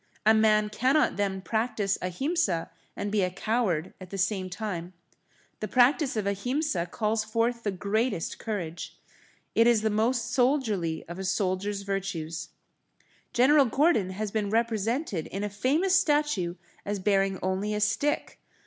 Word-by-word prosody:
A 220 - +7
man 215 -1 +4
cannot 260 +7 +2
then 195 -2 -1
practice 220 -2 -1
Ahimsa 185 - -1 0.2
and 205 - -3
be 210 -1 +2
a 180 - +1
coward 195 -4 -1
at 185 - -9
the 195 - -6
same 190 -1 0
time. 180 -3 -5 0.7
The 215 - -3
practice 260 +2 +3
of 210 - -1
Ahimsa 200 - -1
calls 215 +2 -1
forth 230 +2 0
the 215 - -1
greatest 205 0 -1
courage. 175 -7 -5 0.6
It 230 +1 +5
is 230 -3 +4
the 220 - +2
most 230 +3 0
soldierly 225 - +1
of 170 +2 -7
a - - -3
soldier's 195 +1 -1
virtues. 175 -5 -4 0.8
General 275 +3 +5
Gordon 260 - +2
has 205 +2 -4
been 210 -2 -1
represented 225 - 0
in 195 +2 -4
a 210 - -1
famous 315 - +2
statue 295 - +1 0.3
as 205 0 -2
bearing 195 0 +1
only 190 +3 -1
a - - -1
stick. 225 +8 0
210 Hz, 150 wpm, -27 LUFS, 190-240 Hz, 0.8 s, A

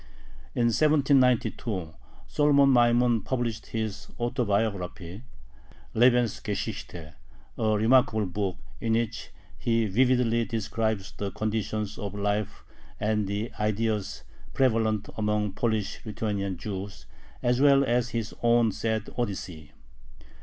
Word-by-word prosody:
In 120 -1 +3
1792 125 - +2 0.3
Solomon 140 -2 +4
Maimon 120 -1 +4
published 115 -2 -3
his 110 -2 -4
"Autobiography" 100 -5 -2 0.7
(Lebensgeschichte), 110 -8 0 0.4
a - - -4
remarkable 110 -1 +3
book, 95 0 -3 0.2
in 115 -1 0
which 115 -1 -2 0.3
he 115 -1 +1
vividly 120 +2 +2
describes 110 -3 -2
the 100 - -4
conditions 110 0 -3
of 100 -3 -5
life 105 0 -2 0.4
and 105 -1 0
the 105 +3 -3
ideas 105 -1 -1 0.3
prevalent 110 -5 +1
among 105 -1 0
Polish 110 -1 -2
Lithuanian 100 -3 -3
Jews 100 +2 -6 0.4
as 125 +1 +2
well 140 -1 +6
as 125 -1 +1
his 115 -2 -3
own 120 -1 +4
sad 110 +1 -2
Odyssey. 90 -8 -4
110 Hz, 105 wpm, -27 LUFS, 105-120 Hz, 0.7 s, well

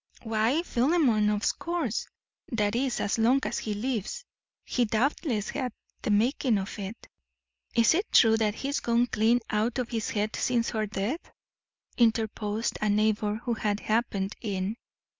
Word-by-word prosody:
"Why, 225 +7 +1
Philemon, 245 -7 +2
of 210 0 0
course; 335 - -2 0.4
that 210 -2 +1
is, 255 0 0
as 205 - 0
long 245 +5 +4
as - - -1
he 210 -2 -3
lives. 220 -1 -3 0.4
He 245 - +1
doubtless 230 - 0
had 250 - -3 0.3
the - - -3
making 230 +2 +2
of 195 +2 -5
it." 200 +3 -7 0.7
"Is 230 +3 +5
it 380 +6 -1
true 225 -2 +6
that 215 -2 +1
he's 280 +4 -2
gone 235 +1 +2
clean 235 +1 +2
out 220 +4 0
of 250 -2 -2
his 225 -2 -2
head 210 0 -1
since 240 -2 0
her 215 -2 -1
death?" 210 - -3 0.7
interposed 220 -1 +1
a 215 - +1
neighbour 210 +1 +1
who 240 - 0
had 210 -2 -1
happened 215 -3 -1
in. 200 -1 -2
225 Hz, 155 wpm, -28 LUFS, 210-245 Hz, 0.7 s, true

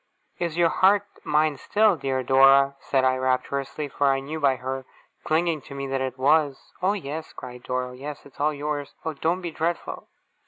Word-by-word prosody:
'Is 170 -2 -2
your 170 -1 +4
heart 200 +3 +4 0.2
mine 150 -1 +2
still, 210 +6 +3
dear 135 -3 -2
Dora?' 135 +2 +5
said 135 -2 0
I, 130 0 +3
rapturously, 135 +3 -1
for 140 0 0
I 135 0 +3
knew 150 +4 -5
by 140 -3 +3
her 130 +1 -4 0.4
clinging 160 -1 +1
to 140 - -8
me 140 0 -4
that 135 0 -2
it 130 -1 -3
was. 145 +1 +1
'Oh, 190 +2 +2
yes!' 160 -5 -6
cried 125 -1 -9
Dora. 125 0 -2
'Oh, - - -11
yes, 140 +3 -8
it's 140 - -17
all 150 +2 +2
yours. 145 -1 -4
Oh, 160 - -1
don't 165 +5 -1
be 170 -2 -4
dreadful! 165 +2 -3
140 Hz, 195 wpm, -25 LUFS, 135-160 Hz, 0.4 s, Dora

